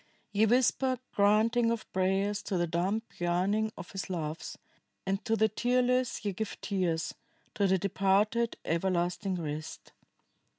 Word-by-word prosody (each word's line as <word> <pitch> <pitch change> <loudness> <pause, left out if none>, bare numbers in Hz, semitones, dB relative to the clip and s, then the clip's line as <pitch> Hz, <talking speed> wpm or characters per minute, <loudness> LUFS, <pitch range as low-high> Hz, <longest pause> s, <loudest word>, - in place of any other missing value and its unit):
Ye 210 +2 +3
whisper 255 +2 +3 0.2
granting 220 +4 +3
of 230 -1 -2
prayers 195 +2 +1
to 190 - -1
the 175 - +2
dumb 180 +6 0 0.2
yearning 190 +5 +1
of 175 - -9
his 195 -1 -5
loves, 160 -3 -4 0.5
and 195 +1 -1
to 225 - +2
the 220 0 +4
tearless 250 +1 +1
ye 200 - 0
give 220 +3 -4
tears, 175 -5 -1 0.4
to 200 -1 +2
the 190 0 +3
departed 200 +4 +1
everlasting 180 +3 0
rest. 155 -2 -6
200 Hz, 135 wpm, -30 LUFS, 180-220 Hz, 0.5 s, the